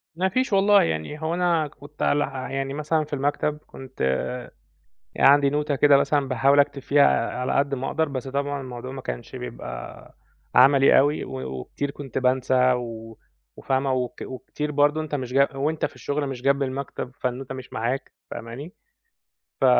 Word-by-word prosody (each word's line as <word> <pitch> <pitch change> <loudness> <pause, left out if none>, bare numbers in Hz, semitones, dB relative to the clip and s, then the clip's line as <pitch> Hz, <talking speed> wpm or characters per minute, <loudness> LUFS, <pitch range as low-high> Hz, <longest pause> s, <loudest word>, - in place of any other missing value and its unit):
ما 190 +2 +1
فيش 255 +1 0
والله، 200 +1 +5
يعني 80 - -3
هو 160 +1 -1
أنا 170 -3 +1
كنت 145 +1 -14
عل 145 - +3 0.3
يعني 135 0 -2
مثلًا 150 +1 0
في 150 - -11
المكتب 145 +2 0
كنت 130 0 -11 1.2
عندي 140 0 +6
نوتة 150 0 0
كده 145 0 +6
مثلًا 140 -1 +1
باحاول 135 +3 +3
أكتب 140 -1 +2
فيها 140 +1 +4 0.3
على 125 - -1
قد 140 0 +1
ما 130 +1 -3
أقدَر 160 0 0
بس 135 -1 -5
طبعًا 140 +1 -2
الموضوع 125 0 -7
ما 135 -1 -7
كانش - - -6
بيبقى 60 0 -8 0.4
عملي 135 +1 +7
أوي 145 +2 +1
و 65 0 -5
وكتير 140 - -4
كُنت 140 -3 -7
بانسى 130 0 +3
و 115 -2 -6 0.4
وفاهمة 135 0 0
وك 125 -2 -3
وكتير 150 +3 -5
برضه 145 +2 +2
أنت 155 -1 -4
مش 125 -2 -4
ج 140 +1 +5
وأنت 150 +3 0
في - - -7
الشغل 145 0 -2
مش 130 -2 -6
جنب 140 +1 +2
المكتب، 130 -1 -4
فالنوتة 130 +1 -3
مش 130 -1 -10
معاك 120 +4 -2 0.2
فاهماني، 125 - -7 0.9
ف - - +4
140 Hz, 165 wpm, -24 LUFS, 130-145 Hz, 1.2 s, عملي